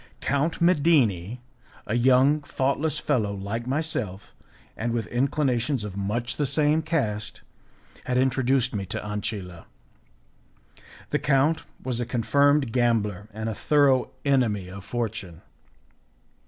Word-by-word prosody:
Count 145 +4 0
Medini, 135 - +2 0.4
a - - -3
young, 130 +5 +4
thoughtless 145 +3 -1
fellow 115 -9 0
like 105 +5 -4
myself, 130 - -3 0.4
and 115 +1 -2
with 115 -2 -1
inclinations 130 -1 0
of 105 -3 -6
much 105 +5 -2
the 145 - 0
same 150 +3 +2
cast, 115 -11 -2 0.6
had 125 -1 0
introduced 130 -1 +2
me 100 -2 -2
to 95 - -4
Ancilla. 105 -4 -5 1.5
The - - +1
count 145 +3 +2 0.2
was 125 -2 -1
a 120 - -2
confirmed 140 +2 +2
gambler 110 -5 0
and 110 +1 -5
a 110 - -1
thorough 140 +1 +3 0.2
enemy 115 -9 +1
of 95 +1 -9
fortune. 105 -7 -4
120 Hz, 120 wpm, -25 LUFS, 105-140 Hz, 1.5 s, young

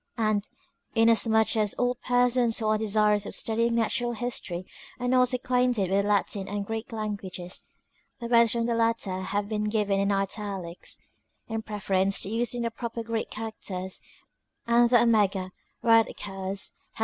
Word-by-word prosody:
And, 215 -2 0 0.5
in 225 0 +5
as 230 0 +4
much 220 0 +3
as 210 -2 +1
all 245 0 +1
persons 245 -1 +2
who 225 - -1
are 215 0 +3
desirous 210 -1 +2
of - - -2
studying 230 +1 0
Natural 240 +1 0
History, 210 -6 -3 0.3
are 245 - -2
not 250 0 +4
acquainted 250 -6 +1
with 195 +1 +3
the 200 - -3
Latin 200 -1 0
and 205 0 -3
Greek 225 +2 -5
languages, 200 -5 -5 0.5
the 235 - -7
words 235 -1 +4
from 235 -1 0
the 235 - 0
latter 225 -5 0
have 200 +2 -2
been 210 0 -2
given 210 -2 +1
in 200 +1 +1
italie$t 195 -3 -3 0.4
in 225 -1 -3
preference 195 -2 0
to - - -4
using 240 +2 -1
the 230 - -1
proper 230 0 -5
Greek 225 -1 -3
characters, 200 -4 -6 0.6
and 235 0 +4
the 240 -1 +6
omega, 200 -5 +2 0.3
where 230 -1 +6
it 225 - 0
occurs, 195 -1 -4 0.2
has - - -14
220 Hz, 170 wpm, -27 LUFS, 200-235 Hz, 0.6 s, the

